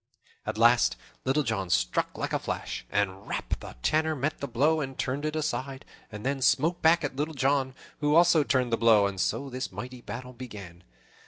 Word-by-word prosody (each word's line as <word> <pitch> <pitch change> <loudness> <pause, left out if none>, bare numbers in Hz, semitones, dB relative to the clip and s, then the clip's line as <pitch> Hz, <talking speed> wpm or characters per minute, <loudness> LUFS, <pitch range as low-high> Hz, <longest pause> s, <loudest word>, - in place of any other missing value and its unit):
At 110 0 -2
last 120 +1 +5 0.3
Little 135 +3 +2
John 105 -7 -2
struck - - 0
like - - -3
a - - +1
flash, - - -5
and 100 -1 -1
"rap!" - - -3
the - - -10
Tanner 155 0 +2
met 145 +2 -2
the 140 - -3
blow 150 +6 +2
and 135 -2 -5
turned 135 +3 -2
it 155 0 -2
aside, 140 -3 -3 0.3
and 105 +1 -8
then 135 0 -1
smote 165 +7 +2
back 165 +1 +4
at 140 -2 -3
Little 150 +2 -2
John, 135 0 +1 0.2
who 150 0 +2
also 170 -1 +6
turned 130 -4 +1
the - - +3
blow; 110 -3 +5
and 100 -1 -2
so 140 - -1
this 130 +1 -4
mighty 125 0 -7
battle 125 +1 -7
began. 100 -8 -10
130 Hz, 195 wpm, -28 LUFS, 115-150 Hz, 0.3 s, also